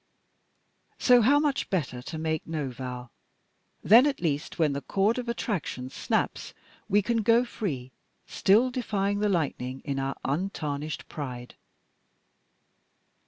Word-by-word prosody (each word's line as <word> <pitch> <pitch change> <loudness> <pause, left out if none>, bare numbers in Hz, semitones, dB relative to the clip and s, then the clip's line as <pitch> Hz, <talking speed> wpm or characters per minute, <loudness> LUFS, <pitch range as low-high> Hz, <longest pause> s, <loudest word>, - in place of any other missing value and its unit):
So 245 -1 +5
how 270 +6 +5
much 290 -2 0
better 135 -9 -2
to 160 +5 -7
make 160 0 -2
no 150 -5 -3
vow; 125 -1 -7 0.7
then 235 +8 +7
at 280 - -1
least 150 -2 -2
when 155 -4 +2
the 140 - -3
cord 205 - +1
of 245 -1 -5
attraction 175 - -3
snaps, - - -2 0.3
we 205 +1 +3
can 235 +3 0
go 230 +2 +4
free, 140 - -4 0.3
still 225 +6 +3
defying 205 -5 -1
the 210 0 +1
lightning 135 -7 -1
in 140 -2 -2
our 135 0 -2
untarnished 150 -2 -3
pride." 125 -4 -6
165 Hz, 130 wpm, -27 LUFS, 140-225 Hz, 0.7 s, then